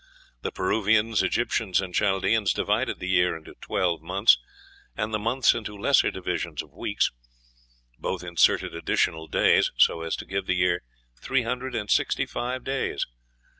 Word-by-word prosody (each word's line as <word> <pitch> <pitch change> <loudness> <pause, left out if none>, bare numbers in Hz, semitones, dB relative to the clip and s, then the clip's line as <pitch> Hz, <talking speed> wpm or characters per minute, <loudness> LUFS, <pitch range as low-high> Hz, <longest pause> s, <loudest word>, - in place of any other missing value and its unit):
The - - -3
Peruvians, 110 +3 +2
Egyptians, 115 -5 0
and 95 -2 -4
Chaldeans 100 +2 +2
divided - - 0
the 90 - -6
year 90 -2 +2
into 80 - -13
twelve 85 -4 -1
months, 95 +6 +4 0.6
and 110 - -2
the 105 - 0
months 120 +4 +3
into 105 -3 -6
lesser 100 - +3
divisions - - -3
of - - -20
weeks. - - 0 0.9
Both 90 - -3
inserted 85 -1 +2
additional 80 -1 -1
days, - - +3
so 80 - +4
as 80 0 -2
to - - -8
give 95 0 -3
the 95 - +1
year 90 -1 +1 0.4
three 135 -2 +1
hundred 125 +2 -3
and 105 - -2
sixty - - +2
five 125 +1 -4
days. 135 0 -2
100 Hz, 155 wpm, -26 LUFS, 90-115 Hz, 0.9 s, months